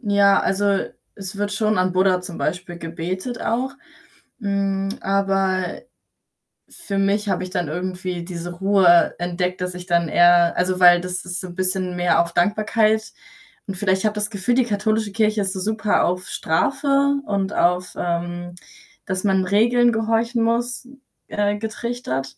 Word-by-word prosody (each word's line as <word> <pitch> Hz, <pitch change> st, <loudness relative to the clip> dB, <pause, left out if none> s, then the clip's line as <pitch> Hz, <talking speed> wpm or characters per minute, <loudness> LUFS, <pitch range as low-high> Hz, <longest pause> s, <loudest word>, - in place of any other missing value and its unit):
ja, 200 Hz, -3 st, +4 dB
also, 200 Hz, 0 st, +1 dB, 0.4 s
es 195 Hz, 0 st, -8 dB
wird 205 Hz, 0 st, -2 dB
schon 215 Hz, 0 st, 0 dB
an 185 Hz, 0 st, +1 dB
Buddha 185 Hz, 0 st, +2 dB
zum 180 Hz, -2 st, -8 dB
Beispiel 180 Hz, -1 st, -3 dB
gebetet 185 Hz, +8 st, -5 dB
auch, 255 Hz, +4 st, -1 dB, 0.7 s
mm, 195 Hz, -2 st, -1 dB
aber 195 Hz, -2 st, 0 dB, 0.9 s
für 200 Hz, -2 st, -6 dB
mich 200 Hz, +2 st, +1 dB
habe 195 Hz, -, 0 dB
ich 185 Hz, -, -6 dB
dann 180 Hz, -3 st, -2 dB
irgendwie 180 Hz, +1 st, -4 dB
diese 175 Hz, 0 st, -6 dB
Ruhe 190 Hz, -2 st, +4 dB
entdeckt, 180 Hz, +1 st, -2 dB
dass 180 Hz, 0 st, -3 dB
ich 180 Hz, 0 st, -9 dB
dann 170 Hz, -1 st, +2 dB
eher 175 Hz, +1 st, +5 dB
also, 180 Hz, 0 st, 0 dB
weil 175 Hz, -1 st, +7 dB
das 180 Hz, 0 st, -5 dB
ist 180 Hz, +1 st, -4 dB
so 185 Hz, -, -7 dB
'n 175 Hz, -, -11 dB
bisschen 185 Hz, -1 st, -1 dB
mehr 175 Hz, -1 st, +3 dB
auf 170 Hz, 0 st, -4 dB
Dankbarkeit, 215 Hz, +3 st, +1 dB, 0.6 s
und 195 Hz, -, -4 dB
vielleicht 190 Hz, +1 st, 0 dB
habe 215 Hz, 0 st, +1 dB
das 210 Hz, 0 st, -2 dB
Gefühl, 200 Hz, +3 st, 0 dB
die 255 Hz, -1 st, +3 dB
katholische 215 Hz, 0 st, -1 dB
Kirche 215 Hz, 0 st, +1 dB
ist 190 Hz, -1 st, -2 dB
so 190 Hz, -, -5 dB
super 220 Hz, +2 st, +1 dB
auf 180 Hz, +1 st, -2 dB
Strafe 280 Hz, -, +1 dB
und 200 Hz, -1 st, -1 dB
auf, 180 Hz, +1 st, +1 dB
ähm, 175 Hz, 0 st, -3 dB, 0.5 s
dass 185 Hz, -1 st, -3 dB
man 190 Hz, -2 st, +2 dB
Regeln 240 Hz, +5 st, +3 dB
gehorchen 225 Hz, +1 st, 0 dB
muss, 240 Hz, +2 st, -1 dB, 0.4 s
äh, 205 Hz, 0 st, 0 dB
getrichtert. 220 Hz, -, -4 dB
195 Hz, 160 wpm, -21 LUFS, 180-215 Hz, 0.9 s, weil